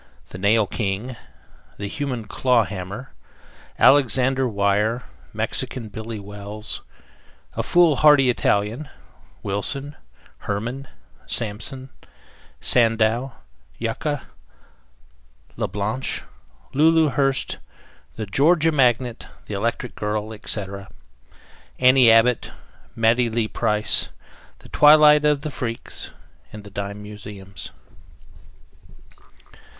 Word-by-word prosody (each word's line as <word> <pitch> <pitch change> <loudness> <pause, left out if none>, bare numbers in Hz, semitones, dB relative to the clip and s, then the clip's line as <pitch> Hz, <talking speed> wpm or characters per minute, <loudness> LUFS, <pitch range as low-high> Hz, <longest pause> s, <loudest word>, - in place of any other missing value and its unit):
THE 90 - -9
NAIL 105 +2 +3
KING, 105 +4 -3 0.6
THE 100 - -4
HUMAN 125 0 -4
CLAW 125 +2 +2
HAMMER; 100 +6 -7 0.7
ALEXANDER 130 -1 +4
WEYER; 105 +3 +1 0.3
MEXICAN 115 -5 -3
BILLY 110 +1 -6
WELLS; 100 +1 -4 0.7
A - - 0
FOOLHARDY 150 -6 +5
ITALIAN; 115 +5 -1 0.5
WILSON; 135 +9 -2 0.4
HERMAN; 120 +7 -4 0.4
SAMPSON; 120 +4 -5 0.7
SANDOW; 115 +2 +2 0.4
YUCCA; 130 +5 -3 1.3
LA - - -2
BLANCHE; 105 +5 -2 0.5
LULU 160 +2 +4
HURST. 135 -1 0 0.6
THE 110 - -4
GEORGIA 155 - +3
MAGNET, 125 -4 +1 0.2
THE - - -7
ELECTRIC 115 +4 -2
GIRL, 105 +1 -3
ETC.; 100 -2 -2 0.9
ANNIE 130 -1 +6
ABBOTT; 115 +2 +4 0.5
MATTIE 115 +1 +3
LEE 115 -1 -1
PRICE. 105 -2 +1 0.5
THE - - -17
TWILIGHT 150 0 +6
OF 150 -1 +2
THE 155 - -5
FREAKS. 120 -3 -5 0.4
THE 105 -1 -10
DIME 100 +1 -5
MUSEUMS. 100 -2 -9
115 Hz, 90 wpm, -22 LUFS, 105-135 Hz, 1.3 s, ANNIE